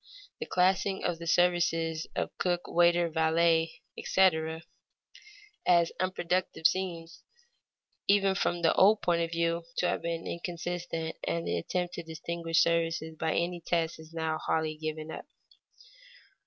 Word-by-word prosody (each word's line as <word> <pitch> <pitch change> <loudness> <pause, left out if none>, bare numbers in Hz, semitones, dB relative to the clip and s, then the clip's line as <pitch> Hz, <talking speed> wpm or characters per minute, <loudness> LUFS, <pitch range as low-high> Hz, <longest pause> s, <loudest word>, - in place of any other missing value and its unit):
The 465 - -5
classing 190 +1 +1
of 175 -2 -1
the 170 - -7
services 165 -2 +2
of - - -3
cook, 175 -1 +1
waiter, 175 0 +3
valet, 160 0 +2
etc., 160 -3 +1 1.0
as 170 -2 +4
unproductive 185 -2 -1
seems, 170 -2 0 0.9
even 195 -1 +4
from 175 -2 -1
the 165 - +4
old 205 +3 +5
point 170 -1 +2
of 165 - -1
view, 170 0 0 0.2
to 180 - +2
have - - -1
been 165 0 -3
inconsistent, 170 -1 -4
and 85 0 -2
the 85 0 -1
attempt 180 - -3
to 170 - -5
distinguish 165 +1 0
services 165 -1 0
by 160 0 -1
any 175 +1 -1
such - - -15
test 165 -2 0
is 160 0 -13
now 160 -1 -2
wholly 160 -1 -1
given 155 0 -5
up. - - -8
170 Hz, 140 wpm, -29 LUFS, 160-175 Hz, 1.0 s, old